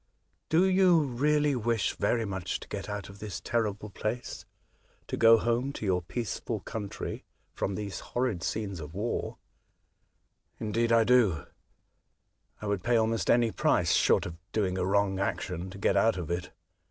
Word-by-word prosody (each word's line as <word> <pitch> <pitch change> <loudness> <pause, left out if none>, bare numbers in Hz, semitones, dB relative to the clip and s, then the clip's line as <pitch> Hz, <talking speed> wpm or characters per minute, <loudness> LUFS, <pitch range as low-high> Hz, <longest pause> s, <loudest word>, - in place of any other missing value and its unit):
'' - - -46
Do 170 +4 +4
you 185 -2 +5
really 145 +2 +1
wish 115 -2 0
very 115 -2 0
much 95 -2 -3
to - - -10
get 100 0 -5
out 100 -3 -4
of 100 +1 -13
this 105 -2 -5
terrible 105 -3 -2
place; 110 +5 -4 0.6
to - - -3
go 115 0 +7
home 120 +4 0
to 110 - -5
your 95 -2 +2
The 90 - -16
Escape. - - -41
15 120 - -2
peaceful 110 - -4
country 105 -3 -5 0.3
from 95 - -2
these 100 -3 -4
horrid 120 -8 -2
scenes 100 -3 -3
of 75 +1 -8
war? 110 +4 -2 0.4
" - - -46
*' - - -45
Indeed, 115 +2 0
I 115 -1 +6
do; 110 - +3 1.1
I - - -7
would 100 -2 -1
pay 120 +7 +2
almost 110 -4 +1
any 120 -1 +4
price, - - +2
short - - +3
of 85 -1 -6
doing 95 -4 0
a 90 -1 0
wrong 100 -1 +2
action, 90 -2 -2
to 95 - -10
get 100 - +1
out 115 -3 +3
of 85 -2 -4
it. 85 +1 -2
105 Hz, 185 wpm, -29 LUFS, 95-120 Hz, 1.1 s, go